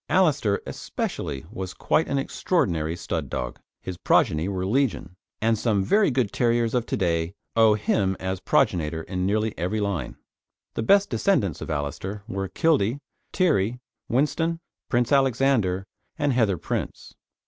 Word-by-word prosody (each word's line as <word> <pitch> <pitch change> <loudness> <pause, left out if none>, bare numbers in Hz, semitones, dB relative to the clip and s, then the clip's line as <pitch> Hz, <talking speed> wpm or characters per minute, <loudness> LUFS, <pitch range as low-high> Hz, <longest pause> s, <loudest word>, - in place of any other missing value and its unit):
Alister 145 - +2
especially 70 +1 -4
was 95 -4 -6
quite 160 - +1
an 140 - 0
extraordinary 85 - 0
stud - - -3
dog. - - -4 0.2
His 95 -2 -5
progeny 80 +1 +2
were 95 -2 -2
legion, 120 -4 0 0.2
and 115 +1 +2
some 105 -5 +1
very 205 - +3
good 125 -6 0
terriers 120 -1 +1
of 120 -2 0
to - - -1
day 85 0 0 0.2
own 110 -2 +5
him 95 -2 +1
as 95 0 -3
progenitor 80 -3 +1
in 90 +1 -2
nearly 110 +2 0
every 90 +6 -1
line. 100 -5 -2 0.6
The - - -2
best 200 - +4
descendants 100 - +1
of - - -6
Alister 80 +7 -4
were 95 -4 -3
Kildee, 140 - +2 0.3
Tiree, 125 - +2 0.3
Whinstone, 160 +6 +1 0.3
Prince 120 0 +1
Alexander, 130 -8 +2 0.3
and 145 -3 +1
Heather 110 -7 +2
Prince. - - -4
105 Hz, 145 wpm, -25 LUFS, 95-135 Hz, 0.6 s, own